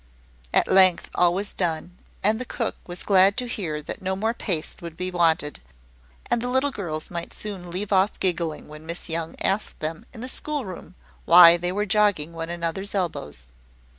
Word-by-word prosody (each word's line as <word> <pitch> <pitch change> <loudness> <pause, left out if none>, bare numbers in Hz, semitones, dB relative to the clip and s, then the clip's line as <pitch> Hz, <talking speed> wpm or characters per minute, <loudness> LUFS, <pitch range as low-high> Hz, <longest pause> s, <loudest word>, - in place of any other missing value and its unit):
At - - +3
length, 185 -2 +5
all 175 -1 +4
was 200 +3 -3
done, 175 0 -2 0.3
and 220 +4 +2
the - - -1
cook 235 -2 -3
was 175 0 -6
glad 195 +1 +5
to 250 - +1
hear 165 -10 -4
that - - -7
no 190 0 -1
more 220 +4 0
paste 175 -9 -3
would 170 -1 -8
be 185 0 -2
wanted, 165 -4 +1 0.7
and 235 - 0
the 245 - -2
little 260 +3 +1
girls 165 -9 -5
might 170 -1 -5
soon 195 -4 -7
leave 195 +4 -3
off 190 +2 +2
giggling 170 -4 -1
when 150 +1 -12
Miss 170 +1 -5
Young 165 0 -3
asked 195 +3 -1
them, 165 +9 -5
in 225 - -10
the 250 - -4
schoolroom, 255 - -5 0.3
why 170 0 +9
they 175 +1 -1
were 205 +2 -1
jogging 205 -6 +2
one 165 0 -5
another's 175 +4 -3
elbows. 75 - -3
180 Hz, 185 wpm, -24 LUFS, 165-205 Hz, 0.7 s, why